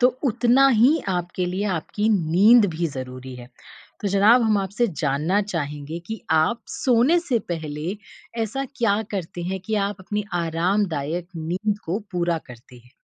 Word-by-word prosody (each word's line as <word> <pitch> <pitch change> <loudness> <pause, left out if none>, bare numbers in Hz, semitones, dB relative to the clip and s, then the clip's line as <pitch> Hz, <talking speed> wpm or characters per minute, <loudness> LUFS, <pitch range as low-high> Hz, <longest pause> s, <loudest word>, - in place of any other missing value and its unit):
तो 250 - +6 0.2
उतना 245 +2 +4
ही 280 +7 +5 0.2
आपके 175 +1 -3
लिए 185 +3 -2
आपकी 210 +7 -2 0.2
नींद 210 +6 +6
भी 170 +1 0
ज़रूरी 130 0 -7
है, 120 -1 -10 0.5
तो 205 - -1
ज़नाब 205 +5 +5
हम 215 -2 +3
आपसे 200 +5 0 0.2
जानना 150 +8 +1
चाहेंगे 150 0 -4
कि 220 0 -5 0.2
आप 230 +9 0
सोने 255 +7 +3
से 275 -9 0
पहले, 160 +3 -4 0.5
ऐसा 245 +5 -3
क्या 220 -3 +2
करते 175 -2 -4
हैं 190 - -3
कि 220 - -1
आप 205 - -6
अपनी 210 +2 -3 0.2
आरामदायक 170 -1 -1
नींद 185 +6 -2
को 175 +5 -1
पूरा 175 -2 0
करते 125 +1 -14
हैं? 120 0 -19
190 Hz, 155 wpm, -23 LUFS, 160-220 Hz, 0.5 s, तो